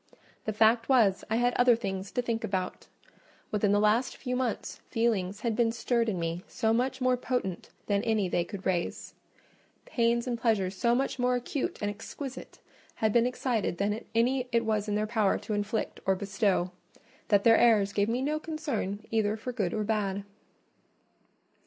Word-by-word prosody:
The 215 - 0
fact 225 +3 +3
was, 220 -8 +4
I 220 - +1
had 245 +1 +2
other 245 -1 +6
things 195 -3 -4
to 245 - 0
think 230 -2 -2
about; 185 -1 -3 0.6
within 210 -1 +2
the 205 - +4
last 215 +4 +2
few 250 -1 -3
months 250 -3 -3
feelings 210 -5 0
had 230 -3 0
been 230 0 +2
stirred 230 0 0
in 190 -4 -2
me 165 +2 -3
so 220 0 0
much 260 +3 0
more 255 0 +3
potent 245 -8 -3 0.2
than 200 -1 +1
any 220 -4 +1
they 175 -1 +1
could 195 +2 -8
raise—pains 230 +5 -3
and 240 -2 -3
pleasures 200 -5 +1
so 235 +5 +2
much 270 +1 -1
more 250 0 +2
acute 250 +3 -2
and 205 - 0
exquisite 255 +5 -8 0.4
had 220 -1 +1
been 235 0 +4
excited 245 -7 -1
than 205 +3 -1
any 250 +2 +2
it 230 -1 +2
was 215 -1 0
in 210 - 0
their 210 0 +1
power 215 -3 +1
to 215 - -5
inflict 205 +2 -2
or 190 - +4
bestow—that 195 +1 -1
their 225 -1 +6
airs 210 -4 +4
gave 205 +1 +1
me 245 +3 0
no 305 +2 0
concern 275 - -3
either 220 -1 +1
for 250 +3 -5
good 200 -7 -1
or 215 - -1
bad. 205 -2 -1
220 Hz, 175 wpm, -29 LUFS, 200-240 Hz, 0.6 s, other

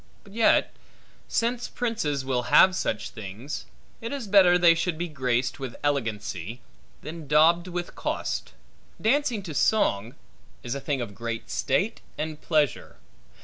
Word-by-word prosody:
But 200 - -16
yet, 225 0 +3 0.5
since 240 +1 0
princes 155 - -2
will 125 -2 -1
have 185 +7 +7
such 105 - -2
things, 110 +7 -7 0.3
it 230 - -5
is 280 -4 -4
better 190 -3 +6
they 175 -1 +6
should 165 0 -1
be 175 +2 -2
graced 130 -4 -1
with 130 -3 -5
elegancy, 115 - -2 0.4
than 160 -1 -7
daubed 165 +4 +4
with 175 -1 -4
cost. - - -3 0.5
Dancing 240 -2 +1
to 165 -4 -6
song, 120 - +1 0.5
is 120 - -3
a 140 - -4
thing 140 -2 -1
of 115 -4 -5
great 115 +1 -5
state 195 - 0 0.2
and 155 0 -4
pleasure. 150 -5 0
150 Hz, 145 wpm, -26 LUFS, 125-185 Hz, 0.5 s, have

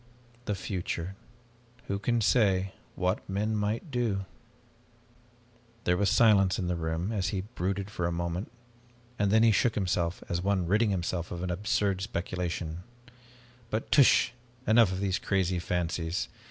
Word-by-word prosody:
The 105 - -1
future 90 -2 -4 0.7
who 100 0 -2
can 120 +3 +1
say 100 -4 +3 0.2
what 90 +3 0
men 105 +3 0
might 105 - -2
do 110 -6 0 0.8
?" 120 -1 -32
There 90 - +2
was 100 +1 +2
silence 100 -5 +5
in 95 - -2
the 90 0 0
room 80 +4 -2
as 100 -5 -1
he 95 0 -1
brooded 100 -1 -3
for 90 -3 -1
a - - -1
moment, 85 +4 -3 0.7
and 100 -1 +2
then 110 +2 +5
he 115 - +6
shook 110 +2 +2
himself 90 -3 -1
as 85 0 -1
one 95 -1 +1
ridding 105 +5 +3
himself 90 -2 -2
of 90 +1 -3
absurd 95 +1 0
speculations. 85 -4 -3 0.9
"But 110 - -3
tush 140 -3 +6 0.3
enough 110 -3 +5
of 95 +1 -3
these 95 -2 0
crazy 95 -2 0
fancies. 85 0 -2
95 Hz, 150 wpm, -29 LUFS, 90-110 Hz, 0.9 s, he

